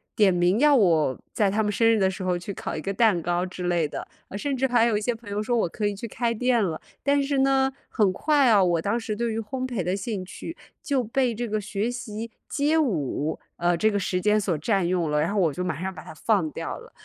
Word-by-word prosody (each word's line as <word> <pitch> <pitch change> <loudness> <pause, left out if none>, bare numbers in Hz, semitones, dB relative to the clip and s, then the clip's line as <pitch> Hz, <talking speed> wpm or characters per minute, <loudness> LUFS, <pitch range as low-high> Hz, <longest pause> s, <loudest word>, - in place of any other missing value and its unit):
点 205 -3 +4
名 180 +4 +2
要 295 +1 +6
我 165 - +3
在 205 -2 +2
他 215 +3 +1
们 210 - 0
生 225 +3 +2
日 225 - +3
的 190 -1 +3
时 190 +1 -6
候 180 -1 0
去 175 +3 -6
烤 - - -5
一 155 - -4
个 195 +4 -3
蛋 210 -3 +3
糕 175 +2 0
之 185 0 -7
类 175 -3 +1
的， - - -6 0.3
甚 275 +6 -2
至 265 +1 +2
还 240 -2 +3
有 225 -3 +2
一 - - -3
些 240 +3 0
朋 225 -2 -12
友 205 +1 -2
说 240 +3 0
我 215 - +1
可 210 - -3
以 205 - -2
去 220 +4 -6
开 235 +1 -1
店 240 0 +2
了。 170 -5 -2 0.2
但 285 0 +3
是 275 0 0
呢， 270 0 +3 0.2
很 210 -5 +2
快 290 +5 +3
啊， 205 -4 +5
我 170 -2 +2
当 205 +7 0
时 220 -2 -4
对 235 +1 -1
于 220 - -2
烘焙 245 -1 -3
的 180 +3 0
兴 200 -1 -4
趣 330 - -8 0.3
就 275 -4 0
被 245 +2 0
这 240 +2 -3
个 215 0 -1
学 210 +2 -2
习 230 -2 -5 0.2
街 300 +3 +1
舞， 160 - -1 0.2
呃， 175 0 +2
这 215 +6 +3
个 205 - 0
时 185 -1 -1
间 210 +2 +3
所 190 -5 0
占 195 0 +1
用 175 -3 0
了， 150 - +1
然 165 +6 0
后 210 - +1
我 170 -5 +3
就 180 - -3
马 170 -3 -3
上 190 0 -3
把 160 - -10
它 - - -10
放 185 0 +1
掉 - - -5
了。 - - -14
210 Hz, 285 characters per minute, -25 LUFS, 180-240 Hz, 0.3 s, 要